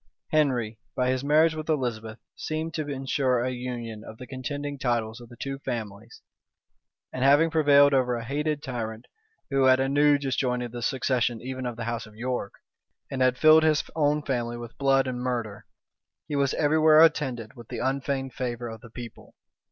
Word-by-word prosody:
Henry, 125 -8 +1 0.2
by 125 0 +1
his 130 0 -2
marriage 155 +3 +4
with 155 0 -6
Elizabeth, 120 -6 -2 0.2
seemed 160 +1 -4
to 155 -3 -3
insure 135 -2 0
a 130 +1 -1
union 120 -3 -6
of 110 - -11
the 125 - -9
contending 140 +2 -5
titles 115 -2 -1
of 120 - -13
the 120 - -12
two 135 0 -4
families; 110 -3 -6 0.9
and 130 - -2
having 145 +4 +5
prevailed 145 -2 +5
over 125 -2 +2
a 115 -1 -5
hated 150 +3 -2
tyrant, 115 -2 -5 0.5
who 135 -1 +3
had 130 0 +5
anew 145 +2 +3
disjointed 125 -3 -1
the 120 0 -6
succession 120 -2 0
even 130 +1 -5
of 120 - -4
the 115 - -5
house 115 -1 -4
of 105 - -16
York, 120 -3 -3 0.6
and 135 - -3
had 130 0 +3
filled 155 +2 +7
his 155 -1 +3
own 150 -1 +1
family 120 -3 -2
with 120 0 -9
blood 135 -1 +3
and 125 -1 -3
murder, 115 -5 -3 0.6
he 150 - -3
was 140 -1 +1
every 155 +1 +2
where 155 0 +6
attended 130 -8 +1
with 120 -3 -13
the - - -6
unfeigned 135 0 -2
favor 120 -2 -4
of 110 -1 -9
the 120 - -13
people. 120 +1 -11
130 Hz, 185 wpm, -26 LUFS, 120-145 Hz, 0.9 s, filled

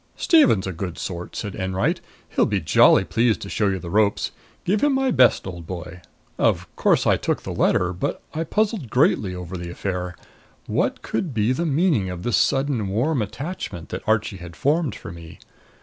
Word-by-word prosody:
"Stephen's 290 - +4
a 95 - -2
good 90 0 -5
sort," 90 -2 -6
said 105 -3 -4
Enwright. 95 0 -1 0.3
"He'll - - +2
be - - 0
jolly - - +5
pleased 115 -3 +1
to 100 - -7
show 105 - +1
you 95 -1 0
the 85 -2 -7
ropes. 105 0 +2 0.3
Give 200 +3 +1
him 290 -1 +3
my 265 -1 +1
best, 125 - +4
old 85 -3 -7
boy!" 90 0 -7 0.4
Of - - +2
course - - +2
I - - +4
took - - -2
the - - -5
letter. 90 0 +2
But 90 - -3
I 160 +1 -1
puzzled 205 - -1
greatly 105 -7 +2
over 90 +1 -6
the 85 -1 -5
affair. 90 0 -4 0.5
What - - -1
could 160 -10 -3
be 110 +2 +2
the 165 +6 0
meaning 150 - +2
of 90 -1 -6
this 120 -5 +1
sudden 135 -6 +1
warm 120 +8 0
attachment 105 - -5
that - - -4
Archie 110 -2 +1
had 85 -1 -10
formed 145 - +1
for - - -9
me? 85 -1 -11
105 Hz, 190 wpm, -23 LUFS, 90-140 Hz, 0.5 s, jolly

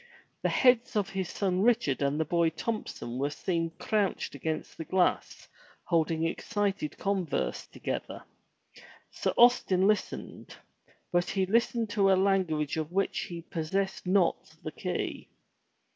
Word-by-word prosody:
The - - +1
heads 250 -3 +3
of 205 -2 0
his 190 -2 -3
son 185 -2 0
Richard 225 - +2
and 140 +2 +1
the 160 - +1
boy 170 +1 +2
Thompson 160 - -4
were 140 +1 +1
seen 165 +2 -1
crouched 210 -3 -1
against 155 +3 -4
the - - -5
glass 180 +2 0 0.4
holding 165 -1 +1
excited 195 -2 -2
converse 195 -4 -1
together. - - -5 0.9
Sir - - -1
Austin 215 -6 +5
listened, 210 +1 -2 0.6
but 175 0 +1
he 190 -1 +1
listened 230 +2 +1
to 200 -2 +3
a - - +6
language 185 -7 +1
of 155 0 -3
which 195 +2 0
he 170 -1 -7
possessed 190 +4 -2
not 185 -2 +1
the - - -4
key. - - -4
185 Hz, 135 wpm, -29 LUFS, 160-200 Hz, 0.9 s, a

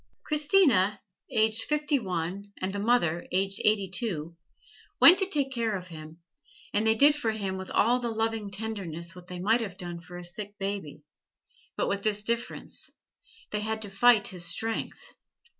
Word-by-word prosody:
Christina, 290 - +3 0.3
aged 220 0 +2
fifty 300 -1 +1
one, 190 0 -4
and 190 +1 -3
the 200 - -3
mother, 200 -7 +1
aged 195 +1 0
eighty 210 -2 +3
two, 175 -5 -3 0.6
went 355 +2 +9
to 385 - +1
take 285 -7 0
care 230 -4 -1
of 180 0 -10
him, 155 -1 -10 0.6
and 215 +2 +1
they 220 - +4
did 290 +5 +6
for 290 -6 -2
him 200 -3 -2
with 190 0 -6
all 240 +3 +3
the 240 -1 -2
loving 225 -2 -2
tenderness 195 -6 -5
what 180 -1 -13
they 180 - -7
might 215 +6 +2
have 195 -5 -5
done 175 -1 -6
for 175 +1 -11
a 175 - -8
sick 205 +3 -4
baby; 195 -7 -5 0.7
but - - 0
with 200 - -1
this 210 0 0
difference 235 +2 -3 0.6
they 210 - -1
had 220 +1 -2
to 205 - -8
fight 220 +1 +4
his 180 -3 -6
strength. 220 +7 -3
205 Hz, 175 wpm, -28 LUFS, 180-225 Hz, 0.7 s, went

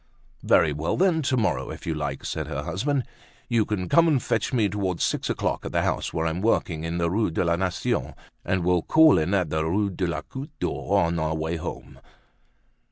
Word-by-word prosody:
"Very 80 -3 +3
well, 80 +3 -2
then, 175 -3 +3
to 130 -2 0
morrow, 70 - 0
if - - -8
you 80 - -1
like," 75 -3 -4
said - - -3
her - - -4
husband. 135 +7 -1 0.4
"You 115 -3 +2
can 95 -4 -2
come 170 - +5
and 150 -5 +3
fetch 110 -2 -1
me 115 -5 +2
towards 95 -3 -2
six - - -1
o'clock - - -1
at - - -6
the - - +2
house - - -1
where 80 - -1
I'm 80 +2 -1
working, 85 -7 0
in 85 +1 -3
the 85 0 +1
Rue 105 +2 +1
de 85 +2 -1
la 85 0 +2
Nation, 95 +7 -2 0.3
and 95 -2 0
we'll 90 -1 +3
call 160 - +5
in 85 +6 0
at 90 -6 0
the 80 0 0
Rue 100 +5 0
de 90 0 -2
la 80 -2 -2
Goutte 140 - -9
d'Or - - 0
on 85 0 0
our 80 0 -1
way 80 +2 -2
home." - - -7
90 Hz, 220 wpm, -25 LUFS, 80-115 Hz, 0.4 s, come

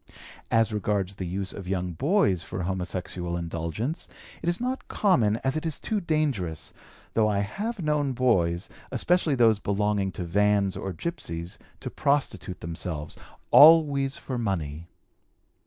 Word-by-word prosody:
As 115 -1 +3
regards 100 -2 -1
the 95 -2 -5
use 95 +2 -3
of 95 -3 -8
young 90 -1 -1
boys 110 - +2
for 90 - -5
homosexual 90 -1 -3
indulgence, 85 - -3 0.3
it 170 - 0
is 175 - -1
not 255 +2 -3
common 120 - +3
as 135 +2 +1
it 155 - -2
is 160 -3 -2
too 215 -2 -2
dangerous, 140 - -1 0.4
though 110 -1 +3
I 100 -1 +1
have 205 - -3
known 150 -3 +1
boys, 90 -9 +1 0.2
especially 175 -5 +2
those 115 -4 +4
belonging 100 -1 0
to 90 - -4
vans 100 +2 +2
or 95 - -4
gypsies, 85 - -5 0.2
to - - -5
prostitute 115 -10 -1
themselves, 80 -2 -5 0.4
always 145 -3 +7
for 130 -2 -4
money. 85 -7 -3
105 Hz, 140 wpm, -26 LUFS, 90-145 Hz, 0.4 s, always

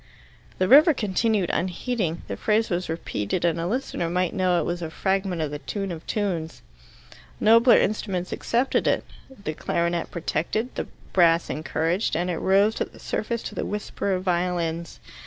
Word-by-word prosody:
The 185 - +1
river 300 - +7
continued 210 -2 +1
unheeding. 180 0 -2
The - - -3
phrase 220 0 +1
was 175 0 -1
repeated 160 - -2
and 170 -1 +1
a 165 - -1
listener 205 -6 -2
might 180 0 0
know 180 -2 +2
it - - 0
was 175 0 -3
a 165 - -3
fragment 190 -1 -1
of 150 - -3
the 145 - -5
Tune 195 +4 -4
of 165 -1 -8
tunes. 175 -7 -2 0.8
Nobler 230 +3 +6
instruments 195 -3 -1
accepted 245 +3 0
it, - - +2 0.3
the 200 -12 -6
clarionet 170 +2 -1
protected, 175 +8 -2
the - - -4 0.3
brass 170 -2 +4
encouraged, 165 +5 -1
and 175 +2 0
it 165 - -3
rose 200 +3 +3
to - - +2
the - - -17
surface 235 +1 -3
to - - -6
the - - -3
whisper 205 -1 -3
of 185 0 -2
violins. 170 -2 -1
180 Hz, 170 wpm, -25 LUFS, 170-210 Hz, 0.8 s, river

